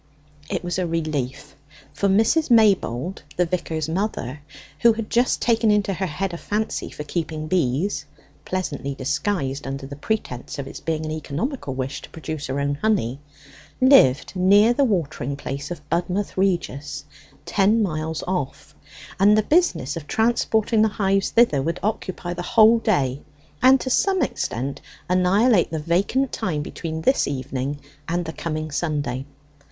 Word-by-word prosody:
It - - -2
was 175 +1 -2
a 180 - 0
relief; 155 -6 -3 0.4
for 200 - +1
Mrs. 225 +11 +3
Maybold, 195 - +3 0.2
the 180 - +3
vicar's 165 -3 -2
mother, 160 - -2 0.4
who 235 -1 +6
had 220 -1 -6
just 245 +2 +2
taken 230 -2 +3
into 205 -1 +2
her 190 +1 -2
head 180 +4 -3
a - - -4
fancy 215 +5 -2
for 150 - -7
keeping 155 0 -3
bees 155 +1 0 0.4
(pleasantly 145 -7 -3
disguised 140 0 -2
under 135 0 -5
the 140 +1 -8
pretence 145 - -3
of 140 - -4
its - - -8
being 160 -1 -2
an 155 - -4
economical 155 - -3
wish 130 +1 -4
to - - -12
produce 155 -2 -6
her 135 +1 -2
own 140 0 -1
honey), 140 - +1 0.6
lived 255 - +5
near 200 +5 +5
the 280 - +2
watering 160 - -1
place 140 0 -5
of 155 -4 -8
Budmouth 180 +5 -1
Regis, 170 -7 -1 0.4
ten 215 +3 +3
miles 160 -3 -2
off, 180 -7 -4 0.5
and 205 +2 +6
the 215 - +3
business 300 - +2
of 160 -3 -7
transporting 220 0 +2
the 220 - +5
hives 195 -1 +2
thither 230 - +4
would 165 +5 -2
occupy 185 -4 -3
the 175 - -5
whole 225 +3 +5
day, 140 - 0 0.4
and 260 +2 +6
to 260 - -3
some 380 +1 +2
extent 135 - -3 0.3
annihilate 185 +3 +3
the 160 - -3
vacant 190 - +1
time 150 -5 -2
between 160 +1 -5
this 265 - +3
evening 135 +1 -3 0.3
and 175 +1 -1
the 160 - -5
coming 155 -1 -4
Sunday. 145 -5 -2
175 Hz, 155 wpm, -23 LUFS, 145-210 Hz, 0.6 s, who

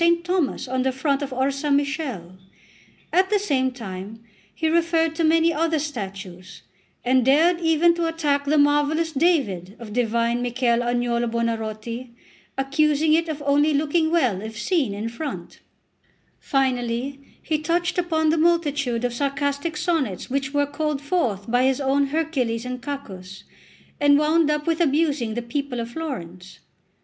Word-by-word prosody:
Thomas 345 -7 -1
on 255 0 -1
the 265 +1 +1
front 275 +2 -1
of 280 - -3
Orsammichele; 275 - -1 0.8
at 375 +1 +3
the 420 - +3
same 280 -10 +1
time 215 -2 -8 0.3
he 320 - -2
referred 330 0 +2
to 330 +1 -1
many 325 +1 +4
other 325 +1 +1
statues, 195 - -6 0.4
and 255 0 +3
dared 320 +7 +4
even 325 +1 +4
to 340 -1 -1
attack 295 -4 0
the 300 +2 +2
marvellous 295 +3 +2
David 265 - 0
of 225 -4 -9
divine 235 0 +1
Michel 245 -1 +1
Agnolo 240 0 0
Buonarroti, 230 +1 -3 0.4
accusing 300 +3 +2
it 330 +1 +2
of 300 -2 -4
only 290 +1 +3
looking 315 +2 +1
well 255 - +1
if 220 +1 -7
seen 275 - 0
in 210 +2 -4
front; 275 +6 -6 0.8
finally, 260 0 -1 0.2
he 310 -1 -1
touched 345 +4 0
upon 315 -3 +1
the 325 - +1
multitude 290 -8 +1
of 245 - -1
sarcastic 285 +4 -2
sonnets 280 - -1
which 270 0 -1
were 285 0 +2
called 300 0 -2
forth 265 - -1
by 245 +1 +3
his 265 0 +2
own 275 0 +2
Hercules 270 -7 -1
and 250 0 -5
Cacus, 195 -9 -7 0.6
and 285 -1 +5
wound 305 +1 +3
up 300 0 0
with 330 0 0
abusing 285 -7 +1
the 240 - -3
people 255 +1 -3
of 230 0 -5
Florence. 190 - -7
280 Hz, 150 wpm, -23 LUFS, 235-315 Hz, 0.8 s, and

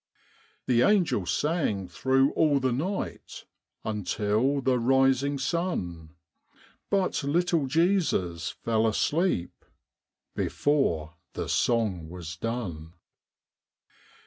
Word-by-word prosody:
The 120 -2 +3
angels 165 - +2
sang 145 - 0
thro' 135 +9 +2
all 150 -3 +3
the 130 -1 0
night 180 +11 -4 0.4
Until 105 +6 0
the 130 -2 +1
rising 135 +3 +2
sun, 95 - -3 0.7
But 195 -6 0
little 165 0 +1
Jesus 130 - +1
fell 115 -1 0
asleep 145 - 0 0.7
Before 85 - 0 0.2
the - - -4
song 105 -9 0
was 85 -2 -7
done. 85 -7 -5
125 Hz, 90 wpm, -27 LUFS, 90-145 Hz, 0.7 s, The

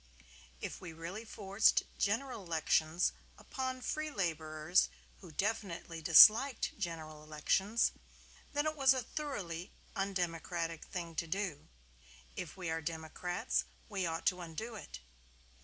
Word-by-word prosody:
If - - -5
we 175 -3 -7
really 170 +7 -6
forced 200 -1 +3 0.2
General 225 +2 0
Elections 160 0 +2 0.3
upon 260 -1 -4
free 310 +4 -2
laborers 160 - +1 0.3
who 180 - -12
definitely 175 -3 -2
disliked 220 - +8
General 160 -5 -5
Elections, 175 +9 +1 0.6
then 290 0 0
it 310 0 0
was 270 -2 +5
a 255 - -1
thoroughly 200 - -5 0.2
undemocratic 170 -3 -2
thing 170 -3 -5
to 165 - -1
do; 185 -4 -3 0.7
if 180 0 -6
we 180 -2 -4
are 160 0 -1
democrats 160 - -2 0.2
we 185 -3 -1
ought 165 0 -3
to 180 0 +2
undo 175 +8 -6
it. 205 - -9
180 Hz, 125 wpm, -34 LUFS, 165-215 Hz, 0.7 s, disliked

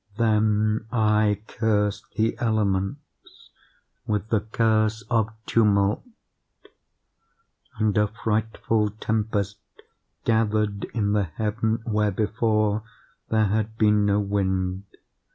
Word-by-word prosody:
"Then 110 -1 +2
I 105 -2 +2
cursed 105 -3 -1
the 110 +1 +1
elements 110 +3 -2 0.6
with 105 0 -1
the 110 - +2
curse 110 0 +1
of 110 -2 +2 0.2
tumult; 100 -2 +2 1.8
and 110 -2 +1
a 105 0 +3
frightful 110 0 -1
tempest 105 -2 -1 0.7
gathered 105 -2 +1
in 105 -3 -1
the 105 -2 +2
heaven 110 +6 -2
where, 105 -2 +1
before, 110 +1 0 0.5
there 110 -1 +3
had 110 +2 -1
been 105 -1 +3
no 100 0 +3
wind. 95 -2 -1
105 Hz, 100 wpm, -24 LUFS, 105-110 Hz, 1.8 s, a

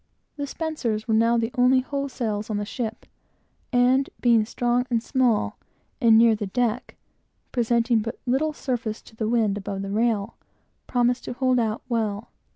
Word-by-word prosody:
The 285 -1 -4
spencers 260 -9 -3
were 225 - +1
now 230 +2 +4
the 230 +1 -1
only 255 +1 +5
whole 280 +1 -3
sails 215 -4 -3
on 215 - -1
the 205 - -2
ship, 225 0 -5 0.7
and, 255 +2 +3
being 230 -3 +4
strong 245 +2 0
and 230 -2 0
small, 250 -6 +1 0.4
and 225 -2 +6
near 230 0 +6
the 210 -1 -4
deck, 245 +3 -1 0.6
presenting 235 -1 +2
but 225 +3 -4
little 270 +5 +1
surface 240 -7 -4
to 220 - -17
the 220 -1 -2
wind 220 -4 +1
above 195 0 -5
the 195 - -5
rail, 220 -1 0 0.5
promised 245 0 +1
to - - -4
hold 255 0 +2
out 220 -1 -1
well. 220 -3 -2
235 Hz, 165 wpm, -24 LUFS, 220-250 Hz, 0.7 s, and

